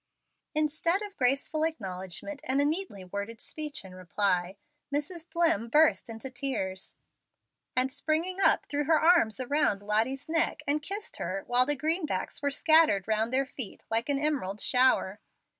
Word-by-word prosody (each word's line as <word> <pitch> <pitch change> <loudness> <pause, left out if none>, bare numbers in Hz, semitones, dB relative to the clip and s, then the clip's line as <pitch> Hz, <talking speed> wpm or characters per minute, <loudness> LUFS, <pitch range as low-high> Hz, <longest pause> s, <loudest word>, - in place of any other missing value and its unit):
Instead 315 +5 +1
of 405 -1 -8
graceful 275 +4 +1
acknowledgment, 195 - -4
and 265 +2 +1
a 285 - +3
neatly 305 - -2
worded 200 +4 -5
speech 300 -6 -6
in 185 - -11
reply, 185 0 -1 0.3
Mrs. 320 +4 -3
Dlimm 325 - +2
burst 305 -2 +3
into 225 +4 -7
tears, 220 -8 -3 0.8
and 255 +1 +2
springing 335 +5 -1
up - - +4
threw 290 0 -2
her 315 +1 +4
arms 320 - +4
around 255 -6 0
Lottie's 225 +7 0
neck 330 +1 0
and 290 +1 0
kissed 400 +7 -6
her, 190 +3 -3
while 245 +1 +3
the 290 - +2
greenbacks 315 +1 -1
were 285 - +1
scattered 305 - +4
round 220 +1 0
their 270 +1 +2
feet 255 -5 -5
like 230 +4 +1
an 285 - +2
emerald 275 -10 -1
shower. 250 -6 +2
275 Hz, 155 wpm, -29 LUFS, 215-310 Hz, 0.8 s, up